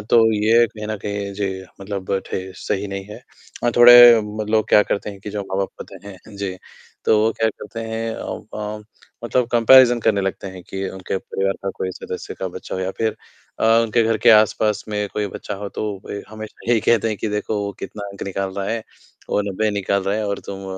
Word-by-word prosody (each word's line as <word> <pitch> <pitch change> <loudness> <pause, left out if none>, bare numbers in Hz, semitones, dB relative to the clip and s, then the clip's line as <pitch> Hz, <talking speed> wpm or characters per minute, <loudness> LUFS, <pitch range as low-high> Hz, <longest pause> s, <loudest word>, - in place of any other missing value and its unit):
तो 110 - +1 0.2
ये 110 +3 +4
कहीं 105 -1 -8
न 110 0 -3
कहीं 100 -1 -4
जी, 95 -1 -3 0.2
मतलब 95 -1 -3
ठे - - -3 0.2
सही 100 +3 -3
नहीं 100 0 -5
है। - - -8 0.5
अ, 120 - +3
थोड़े 120 -1 +10
म 105 +1 -5
लोग 110 -1 +2
क्या 105 - +6
करते 105 +1 -3
हैं 100 - -12
कि 105 - -7
जो 105 - -3
माँ-बाप 95 0 -2
होते - - -9
हैं 100 +1 -13
जी, 100 -2 -4 0.5
तो 110 - +4
वो 110 +1 +2
क्या 110 - +4
करते 110 +1 -8
हैं, 110 0 -3
उ - - -6
अम, 105 0 -5 0.4
मतलब 125 +1 +1
कम्पैरिज़न 120 +1 +7
करने 110 -2 +2
लगते 95 0 -3
हैं 95 -1 -10
कि 95 0 -3
उनके 95 0 -4
परिवार 95 +1 -2
का 100 - -2
कोई 95 - -3
सदस्य - - -7
का - - -4
बच्चा - - -7
हो, 95 - -3
या 95 0 -2
फिर 110 -1 0 0.4
अ, - - +2 0.2
उनके 115 +1 +2
घर 115 0 +2
के - - +5
आसपास 110 -1 +3
में 105 -1 -2
कोई 105 -1 -1
बच्चा 100 - -6
हो, 100 +1 -6
तो 100 -1 -4
वे 100 - -5
हमेशा 110 +2 -7
यही 115 -2 +4
कहते 115 +1 +2
हैं 110 - -2
कि 110 - -1
देखो, 105 +1 -2
वो 100 - -4
कितना 100 -1 -6
अंक 100 - -9
निकाल 95 0 -3
रहा 100 0 -3
है। 115 0 -2 0.5
वो - - +2
90 110 +3 0
निकाल 100 -1 0
रहा 100 - 0
है 110 -1 -2
और 100 - -2
तुम 95 0 -7
105 Hz, 220 wpm, -21 LUFS, 100-110 Hz, 0.5 s, थोड़े